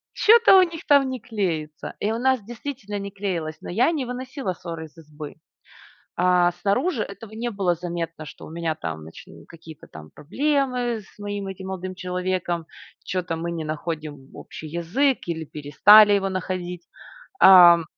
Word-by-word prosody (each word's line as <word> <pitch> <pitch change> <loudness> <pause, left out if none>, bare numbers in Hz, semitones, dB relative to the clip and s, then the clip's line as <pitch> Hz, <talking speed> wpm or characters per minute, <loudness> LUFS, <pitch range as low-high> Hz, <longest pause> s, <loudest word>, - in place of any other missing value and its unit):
чё-то 445 -3 +7
у - - +7
них 335 -1 -5
там 280 -3 +5
не 255 - -4
клеится". 165 -9 -4
И 210 - -1
у 225 - -2
нас 260 -1 +2
действительно 235 -3 -6
не 200 0 -5
клеилось, 175 -6 -4
но - - -8
я 245 - +3
не 285 -6 -2
выносила 250 -4 -5
сор 165 -2 -8
из 155 - -13
избы. 150 -2 -10 0.8
А 180 0 +3
снаружи 225 - 0
этого 200 +2 -10
не 240 +2 -3
было 195 -4 0
заметно, 170 -2 -5
что - - -11
у - - -11
меня 165 -1 -2
там 80 - -6
нач 80 - -12 0.2
какие-то 160 -2 -13
там 75 0 -12
проблемы 250 - -1
с 195 - -21
моим 205 -1 -5
этим 190 0 -7
молодым 185 0 -5
человеком, 180 -2 -3 0.4
чё-то 180 -3 -3
мы 170 +1 -4
не 165 -2 -4
находим 155 -3 -5
общий 155 - -10
язык 175 - 0
или 160 -2 -3
перестали 205 +10 +6
его 195 -1 +1
находить, 180 -2 -4 0.6
ам 175 -3 +8
185 Hz, 165 wpm, -23 LUFS, 165-225 Hz, 0.8 s, ам